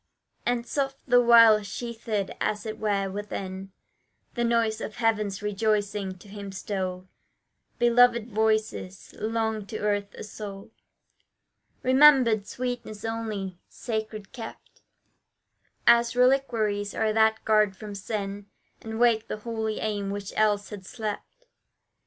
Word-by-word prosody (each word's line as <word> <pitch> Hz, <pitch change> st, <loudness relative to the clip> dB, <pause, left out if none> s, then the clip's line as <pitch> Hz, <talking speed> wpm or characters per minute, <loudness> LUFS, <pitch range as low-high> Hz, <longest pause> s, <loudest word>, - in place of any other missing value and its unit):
And 240 Hz, -1 st, 0 dB
soft 270 Hz, +1 st, -2 dB
the 245 Hz, -1 st, +6 dB
while, 230 Hz, -3 st, +7 dB
sheathed, 225 Hz, -2 st, -4 dB
as 210 Hz, +1 st, -1 dB
it 220 Hz, 0 st, -5 dB
were, 200 Hz, -2 st, 0 dB
within 195 Hz, -1 st, -6 dB, 0.6 s
The 240 Hz, -, -1 dB
noise 230 Hz, -2 st, +1 dB
of 215 Hz, -, -5 dB
heaven's 215 Hz, -4 st, 0 dB
rejoicing, 205 Hz, -2 st, -1 dB
to 180 Hz, -, -16 dB
him 200 Hz, -1 st, -8 dB
stole 185 Hz, -1 st, -4 dB, 0.7 s
Beloved 240 Hz, -1 st, +4 dB
voices, 215 Hz, -3 st, -1 dB
long 220 Hz, -1 st, -1 dB
to 215 Hz, -, -5 dB
earth 205 Hz, -1 st, -1 dB
a -, -, -8 dB
sole 205 Hz, -2 st, -8 dB, 1.1 s
Remembered 255 Hz, -6 st, +5 dB
sweetness 245 Hz, -4 st, -5 dB
only; 215 Hz, -5 st, -4 dB
sacred 220 Hz, -3 st, -5 dB
kept 230 Hz, -4 st, -10 dB, 1.0 s
As 235 Hz, 0 st, +5 dB
reliquaries 230 Hz, -6 st, +2 dB
are 220 Hz, -1 st, +1 dB
that 220 Hz, 0 st, +3 dB
guard 215 Hz, -2 st, +3 dB
from 210 Hz, -2 st, -8 dB
sin, 200 Hz, 0 st, -5 dB, 0.3 s
And 220 Hz, 0 st, -6 dB
wake 230 Hz, -2 st, +3 dB
the -, -, -4 dB
holy 220 Hz, 0 st, -3 dB
aim 205 Hz, -2 st, -2 dB
which 200 Hz, 0 st, -5 dB
else 205 Hz, -2 st, +2 dB
had 205 Hz, -2 st, -7 dB
slept. 220 Hz, -, -6 dB
215 Hz, 120 wpm, -26 LUFS, 205-230 Hz, 1.1 s, while